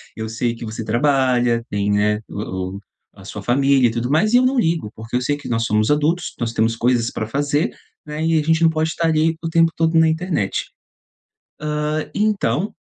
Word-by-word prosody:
eu 110 0 -5
sei 115 +1 -2
que 115 - -9
você 110 0 -5
trabalha, 125 -1 +2
tem, 100 0 -1
né, 105 +1 +2
o 95 -2 -5
o - - -9 0.3
a 95 -2 -15
sua 105 +1 -7
família 135 +1 +3
e - - -4
tudo 120 +2 -3
mais, 170 +10 +2
e 245 - +7
eu 255 - +4
não 260 +1 +1
ligo, 165 - 0
porque 110 +1 -11
eu 125 - -2
sei 145 +4 0
que 145 -3 -9
nós 115 -1 0
somos 105 +3 +1
adultos, 155 +4 0
nós 115 -1 -2
temos 115 +1 +1
coisas 120 -1 +1
pra 110 - -4
fazer, 145 +4 0 0.4
né, 150 +1 -4
e 165 -1 +3
a - - +1
gente 160 +1 +2
não 165 - +6
pode 160 0 -1
tá 165 - 0
ali 160 0 +2
o 165 - -2
tempo 165 0 +3
todo 165 0 +2
na 160 - +5
internet", 160 - -1 1.2
hã, 155 +1 -2
então 205 - 0
135 Hz, 215 wpm, -20 LUFS, 115-160 Hz, 1.2 s, e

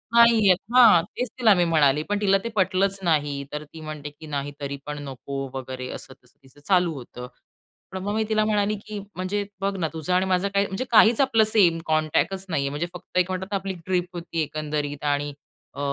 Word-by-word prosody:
नाहीये, 230 -4 +6 0.2
हां, 220 -9 +8
तेच 250 - -2
तिला 225 -4 +6
मी 175 - +2
म्हणाले, 150 -3 +3
पण 205 0 0
तिला 195 -1 +4
ते 230 - -3
पटलंच 190 0 +1
नाही. 145 -4 0
तर 150 0 -4
ती 160 +2 -13
म्हणते, 155 -1 -6
की 150 +2 -14
नाही, 145 -1 -3
तरी 140 0 -4
पण 150 0 -5
नको 135 0 -6
वगैरे. 130 -1 -6
असं - - -8
तसं 125 - -24
तिचं 135 +2 -19
चालू 180 -4 +3
होतं. 125 -2 -9 0.6
पण 190 - -5
मग 205 +1 -2
मी 220 - +1
तिला 215 0 +2
म्हणाली, 210 -1 +1
की 210 -1 -5 0.2
म्हणजे 195 +3 -2 0.2
बघ 195 0 -1
ना, 165 -3 0
तुझं 160 +3 -2
आणि 185 +1 +3
माझं 190 +1 +1
काही 200 0 +3
म्हणजे 195 +7 -4
काहीच 225 +2 +6
आपलं 230 -5 +4
सेम 185 -6 +3
कॉन्टॅक्टच 160 +5 0
नाही 150 -4 0
आहे. 140 - -1
म्हणजे 150 +4 -3
फक्त 180 +1 -8
एक 180 +1 +1
म्हणतात, 190 +2 -4
आपली 195 0 -4
ट्रिप 180 -1 0
होती, 170 -2 -4
एकंदरीत. 150 -1 -4
आणि 145 0 0 0.4
अ, 140 - -10
175 Hz, 205 wpm, -24 LUFS, 145-200 Hz, 0.6 s, हां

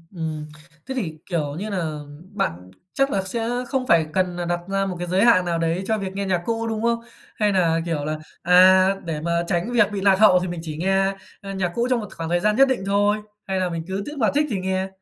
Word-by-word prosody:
Ừm, 155 -2 -4 0.4
thế 265 - -5
thì, 170 -11 -3
kiểu 150 -5 -2
như 200 +6 -4
nà, 165 -6 -3 0.3
bạn 90 - -3 0.2
chắc 275 0 +1
là 195 - +1
sẽ 225 +5 -3 0.2
không 260 -1 -2
phải 165 -2 +4
cần 185 -2 0
nà 175 0 -3
đặt 175 0 -1
ra 195 0 0
một 190 -2 -3
cái 175 - -4
giới 185 +3 +2
hạn 185 -7 +5
nào 170 -1 0
đấy 165 +3 0
cho 220 - +1
việc 190 -2 -5
nghe 200 0 -2
nhạc 185 -2 0
cũ, 230 0 -1
đúng 220 -1 -2
không? 235 0 +2 0.4
Hay 210 -1 +2
nà, 170 -4 +2
kiểu, 155 -4 -2
là, 155 +1 -2 0.2
à, 185 +1 +6 0.2
để 160 -3 -3
mà 170 +1 0
tránh 175 +8 -1
việc 230 -4 +3
bị 200 -1 -3
lạc 195 -1 +4
hậu 200 -4 +7
thì 180 - -3
mình 175 -1 -5
chỉ 155 -2 -6
nghe, 195 +3 +1 0.3
ơ, 195 -1 -7
nhạc 185 -3 -1
cũ 235 +1 +1
trong 250 -2 +2
một 210 - -6
khoảng 165 -1 -4
thời 175 +1 +2
gian 210 +4 +2
nhất 270 +3 +6
định 260 -7 -1
thôi? 205 +1 +2 0.3
Hay 190 -1 -1
là 185 -1 0
mình 165 -1 -4
cứ 190 +1 -3
tức 295 0 -7
mà 225 -5 +2
thích 300 +1 +3
thì 205 - -1
nghe? 190 0 -1
190 Hz, 260 wpm, -23 LUFS, 170-210 Hz, 0.4 s, hậu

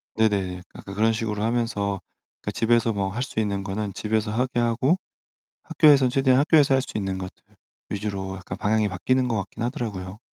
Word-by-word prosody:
네네, 95 -5 +1
약간 100 - -9
그런식으로 110 0 0
하면서 110 -4 0 0.4
그러니까 - - -3
집에서 115 0 +2
뭐 100 -1 -1
할 120 +6 -3
수 110 - -4
있는 100 -2 -1
거는 100 +1 -3
집에서 105 +1 -1
하게 125 +2 0
하고 120 +8 +2 0.7
학교에선 140 -5 +5
최대한 130 0 +3
학교에서 145 -2 +5
할 135 - +3
수 120 - -5
있는 95 -2 -2
것들 95 0 -8 0.5
위주로 100 -2 -3
약간 95 0 -7
방향이 105 +1 +2
바뀌는 125 +7 +1
것 115 - 0
같긴 105 +3 -4
하더라고요. 105 -5 -4
110 Hz, 400 characters per minute, -24 LUFS, 100-120 Hz, 0.7 s, 학교에선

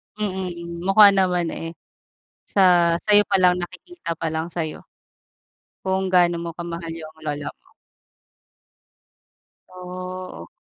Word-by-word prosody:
Mm, 180 -4 -4
mukha 200 +1 +8
naman, 180 -3 +1
eh. 165 +1 -6 0.7
Sa, 175 -3 +4
sa'yo 205 -1 +5
pa 200 - +1
lang 180 -1 +4
nakikita 180 - -6
pa 165 0 -3
lang 160 +1 -2
sa'yo, 165 -3 -4 1.0
kung 190 0 0
gaano 175 -1 +4
mo 170 0 -4
kamahal 170 -1 -5
yung 160 -1 -9
lola 145 -1 -3
mo. - - -36 2.2
Oo. 185 - -8
180 Hz, 115 wpm, -23 LUFS, 170-190 Hz, 2.2 s, mukha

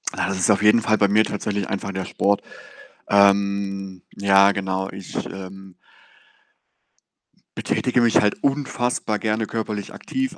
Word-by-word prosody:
Ja, - - -1
das 100 - -2
ist 90 - +1
auf 105 0 +3
jeden 105 +2 +5
Fall 110 0 +2
bei 100 - +3
mir 105 +2 +4
tatsächlich 100 -1 -3
einfach 100 -1 -3
der 95 -1 -4
Sport. 100 0 0 0.7
Ähm, 100 -1 +1
ja 100 0 +5
genau, 95 -1 -3
ich, 95 -1 -10
ähm 95 -1 -10 1.8
betätige 125 -1 0
mich 115 -1 +4
halt 105 -1 -1
unfassbar 125 -5 -1
gerne 110 0 -1
körperlich 105 -3 -4
aktiv, 265 0 -4
100 Hz, 140 wpm, -22 LUFS, 95-110 Hz, 1.8 s, jeden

